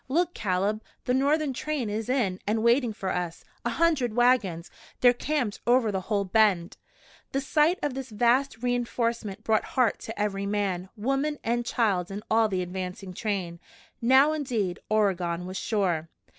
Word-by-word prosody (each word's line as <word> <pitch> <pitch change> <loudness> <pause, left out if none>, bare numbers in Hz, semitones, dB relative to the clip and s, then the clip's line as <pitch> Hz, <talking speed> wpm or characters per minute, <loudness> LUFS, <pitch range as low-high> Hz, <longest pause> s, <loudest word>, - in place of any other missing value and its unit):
"Look, 340 +6 +1
Caleb, 205 +1 -1 0.2
the 250 - +1
Northern 285 +2 +2
train 290 -2 -2
is 215 +2 -3
in 215 -8 0
and 220 +1 +1
waiting 240 0 +3
for 195 -3 -4
us! 175 -2 -4 0.2
A - - 0
hundred 295 -9 +1
wagons! 235 -9 +2 0.3
They're 245 -1 +6
camped 250 -4 -2
over 240 -3 +4
the 190 -1 -2
whole 200 0 -1
bend." 190 -4 +2 0.6
The 270 - +1
sight 300 +5 +2
of 290 - 0
this 265 0 -6
vast 240 +2 +1
re 245 0 +2
enforcement 230 -4 -2
brought 220 -1 +2
heart 245 -5 +3
to 225 - -7
every 200 -1 -1
man, 195 -3 -1
woman 275 +7 0
and 240 +1 0
child 200 -7 0
in 200 +2 -6
all 225 0 +4
the 185 -3 -1
advancing 185 +1 -6
train. 185 -5 -3 0.4
Now, 265 +5 +5
indeed, 235 -12 -2
Oregon 180 -5 +1
was 185 +1 -5
sure. 175 -7 -1
220 Hz, 165 wpm, -27 LUFS, 195-255 Hz, 0.6 s, They're